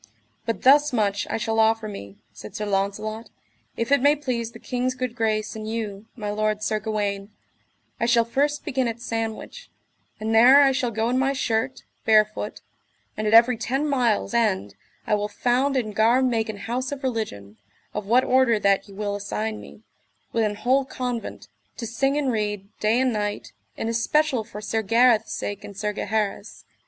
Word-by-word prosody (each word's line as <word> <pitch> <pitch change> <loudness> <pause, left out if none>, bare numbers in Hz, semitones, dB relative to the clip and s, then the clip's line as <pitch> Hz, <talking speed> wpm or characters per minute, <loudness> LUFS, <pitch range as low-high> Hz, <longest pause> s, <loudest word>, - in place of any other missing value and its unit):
But 230 - -2
thus 290 +3 +6
much 205 -4 0
I - - -1
shall 225 0 -1
offer 220 0 +3
me, 100 - -8 0.2
said 105 - -11
Sir 210 - -3
Launcelot, 205 +3 -2 0.5
if 230 +3 -2
it 280 - +5
may 290 +2 +5
please 250 -6 -3
the - - -11
king's 255 0 -2
good 255 -2 -4
grace, 215 -2 -1
and 215 0 -6
you, 220 -2 -5
my 210 -4 -4
lord 215 0 -1
Sir 215 0 0
Gawaine, 205 -2 -2 0.7
I 235 - +1
shall 235 -1 +4
first 290 +5 0
begin 260 -3 0
at 230 0 -4
Sandwich, 225 - -5 0.5
and 220 +1 -2
there 255 +6 +8
I 270 - +5
shall 255 -2 0
go 225 0 -1
in 255 - +1
my 270 +1 +1
shirt, 255 -1 -1 0.2
barefoot; 215 -1 +2 0.5
and 215 0 -2
at 215 - +4
every 235 +1 +6
ten 270 +6 -1
miles' 245 -6 +1
end 205 - +1 0.3
I - - 0
will 210 0 +1
found 250 +6 +1
and 215 -4 -2
gar 230 +5 +3
make 230 -4 0
an 215 - -5
house 250 +6 -3
of 280 -1 -6
religion, 205 - -4 0.4
of 210 -2 -4
what 245 +4 +4
order 255 -3 +3
that 200 -1 +2
ye 195 - -12
will 205 0 -2
assign 215 +2 -4
me, 215 - -14 0.5
with 230 - +2
an 210 -1 -1
whole 260 +6 +2
convent, 250 -3 -5 0.3
to 235 - -5
sing 270 +5 0
and 280 -3 +1
read, 210 -3 -2
day 220 +3 +2
and 260 -2 +2
night, 205 -1 -3 0.2
in - - -3
especial 245 +3 +1
for 210 -1 -9
Sir 220 +1 -1
Gareth's 230 +1 +3
sake 205 0 -5
and 200 - -10
Sir 210 0 -2
Gaheris. 210 0 -3
225 Hz, 185 wpm, -24 LUFS, 210-250 Hz, 0.7 s, there